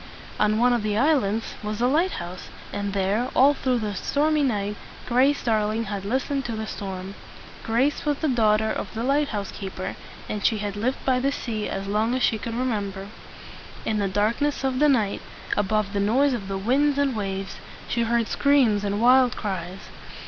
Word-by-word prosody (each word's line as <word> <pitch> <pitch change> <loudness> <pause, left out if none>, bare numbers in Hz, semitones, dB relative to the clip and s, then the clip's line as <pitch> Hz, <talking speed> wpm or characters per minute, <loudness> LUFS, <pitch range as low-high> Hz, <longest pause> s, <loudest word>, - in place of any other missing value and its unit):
On 215 0 +3
one 245 +2 +4
of 240 - +1
the 210 0 -1
islands 230 -6 +1
was 210 0 -4
a 240 - +2
light 320 +9 +2
house; 175 +1 -7 0.3
and 200 0 -2
there, 200 +6 0
all 275 +3 +6
through 260 -3 0
that 210 -4 -3
stormy 300 +6 +1
night, 210 -6 0 0.3
Grace 260 +4 +2
Darling 220 -1 +1
had 200 -2 -5
listened 270 +5 -1
to 235 - -3
the 220 0 -3
storm. 190 -2 -6 0.5
Grace 250 +6 +1
was 295 -1 0
the 315 - -1
daughter 220 -4 +2
of - - -4
the 225 - -2
light 285 +3 +2
house 205 -5 -4
keeper, 190 -2 -6 0.3
and 210 -2 -4
she 220 - +3
had 205 -1 -4
lived 240 +6 -2
by 255 -1 +3
the 275 +2 +1
sea 220 -6 -3
as 195 0 -4
long 215 +4 0
as 255 - 0
she 220 - +2
could 230 +1 -5
re 250 +2 -1
mem 210 -5 -1
ber. 195 +1 -8 0.8
In 215 -1 0
the 200 - +1
darkness 225 +10 0
of 260 -1 0
the 300 0 +5
night, 220 -7 +1 0.3
above 205 0 0
the 200 - 0
noise 255 +8 +3
of 210 -6 -4
the 195 0 -3
winds 275 +8 +2
and 280 -3 +1
waves, 195 -2 -4 0.3
she 235 - 0
heard 230 0 +1
screams 260 -8 +3
and 205 0 -1
wild 255 0 +5
cries. 185 -2 -4
220 Hz, 200 wpm, -24 LUFS, 205-260 Hz, 0.8 s, all